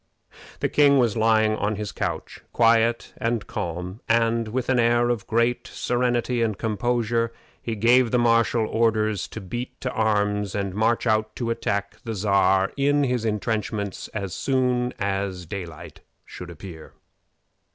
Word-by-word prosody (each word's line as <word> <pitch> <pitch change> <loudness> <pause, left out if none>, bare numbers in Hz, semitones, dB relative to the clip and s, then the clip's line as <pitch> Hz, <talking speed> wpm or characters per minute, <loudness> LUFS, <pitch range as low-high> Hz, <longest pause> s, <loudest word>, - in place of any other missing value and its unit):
The - - +2
king 140 -1 +4
was 120 -5 +2
lying 110 -1 +3
on 105 +1 -1
his 105 0 -4
couch, - - -4
quiet 115 0 +3
and 115 -1 -1
calm, 90 +1 -5
and, 115 0 +2
with 120 +3 -2
an 130 -2 +2
air 120 +1 +3
of 115 -5 -2
great 115 +2 +1
serenity 120 0 0
and 110 -3 0
composure, 115 +1 0 0.3
he 115 - -3
gave 120 +3 +4
the 125 - +2
marshal 115 -1 +3
orders 110 -3 +1
to - - -8
beat 120 +6 -6
to 130 - -2
arms 105 -2 0
and 100 -2 -2
march 110 +4 +1
out 110 -1 +1
to 115 -2 -2
attack 100 -3 -2
the 115 -2 -4
Czar 95 -1 +2
in 145 +1 +2
his 125 -4 0
intrenchments 105 -1 -2
as 100 -4 -5
soon 125 -2 0
as 95 -2 -2
daylight 85 -3 -8 0.3
should 90 - -9
appear. 85 -1 -10
110 Hz, 150 wpm, -24 LUFS, 100-120 Hz, 0.3 s, king